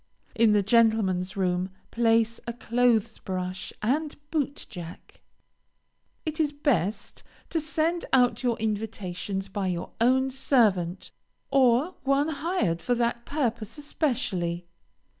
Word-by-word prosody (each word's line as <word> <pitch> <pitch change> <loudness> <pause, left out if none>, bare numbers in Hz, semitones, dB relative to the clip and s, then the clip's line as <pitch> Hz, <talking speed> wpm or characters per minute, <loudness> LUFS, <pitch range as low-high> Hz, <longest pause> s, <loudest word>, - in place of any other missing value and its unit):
In 225 -2 +4
the 205 -1 +3
gentlemen's 205 -4 +2
room, 180 -1 0 0.2
place 230 -1 +2
a 235 - -2
clothes 235 -2 +1
brush 185 0 -4
and 295 +7 0 0.2
boot 290 -3 -1
jack. 175 -3 -10 1.0
It 315 0 -3
is 300 -2 +2
best 235 - -1 0.3
to 330 - +1
send 320 +2 -1
out 250 -2 +4
your 245 -3 +1
invitations 205 -3 -3
by 195 0 -3
your 175 -1 -3
own 260 +2 +3
servant, 205 -10 +1 0.4
or 270 +5 +4
one 275 +3 +2
hired 295 - -1
for 245 +7 +1
that 235 0 -1
purpose 235 -6 -2
especially. 220 - -1
230 Hz, 120 wpm, -27 LUFS, 190-275 Hz, 1.0 s, In